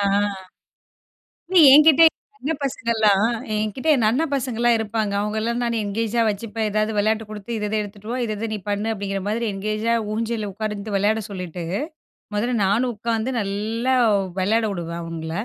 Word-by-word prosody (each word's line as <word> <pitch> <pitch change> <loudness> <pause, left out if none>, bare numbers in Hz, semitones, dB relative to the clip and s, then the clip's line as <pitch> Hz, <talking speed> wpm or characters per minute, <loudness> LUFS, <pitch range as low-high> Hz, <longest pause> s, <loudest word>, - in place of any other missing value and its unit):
ஆ. - - +1 1.5
இல்ல 375 - +2 0.2
என்கிட்ட 305 +1 +7
என் - - -41 0.2
அண்ண 295 - -3
பசங்கள்லாம் 220 -5 +2 0.3
என்கிட்டே 215 +8 -2
என் 235 -5 +1
அண்ணன் 285 +5 0
பசங்கலாம் 240 -3 +1
இருப்பாங்க. 220 -1 -2
அவங்கலாம் 220 +3 -1
நான் 235 -1 -1
என்கேஜா 225 +3 -1
வச்சுப்பேன். 215 +1 -3
ஏதாவது 215 +1 0
வெளையாட்டு 220 +2 +1
குடுத்து 215 +2 -8
இத 210 - -2
இத 215 - -1
எடுத்துட்டு 205 +1 -9
வா, 250 - -2
இத 215 - -2
இத 225 - -3
நீ - - -2
பண்ணு, 205 +2 -1
அப்டிங்கிற 195 -1 -3
மாதிரி 225 +3 -1
என்கேஜா 215 +3 -1 0.2
ஊஞ்சல்ல 225 -1 -2
உட்கார்ந்துட்டு 210 0 -4
வெளையாட 215 +3 +1
சொல்லிட்டு, 180 -3 -6 0.7
மொதல்ல 240 +4 0
நானும் 235 +6 +1
உட்காந்து 230 +3 -2
நல்லா 220 +5 -1 0.4
வெளையாட 220 +4 +2
வுடுவேன் 170 -2 -5
அவங்கள. 165 -1 -6
215 Hz, 155 wpm, -22 LUFS, 205-235 Hz, 1.5 s, என்கிட்ட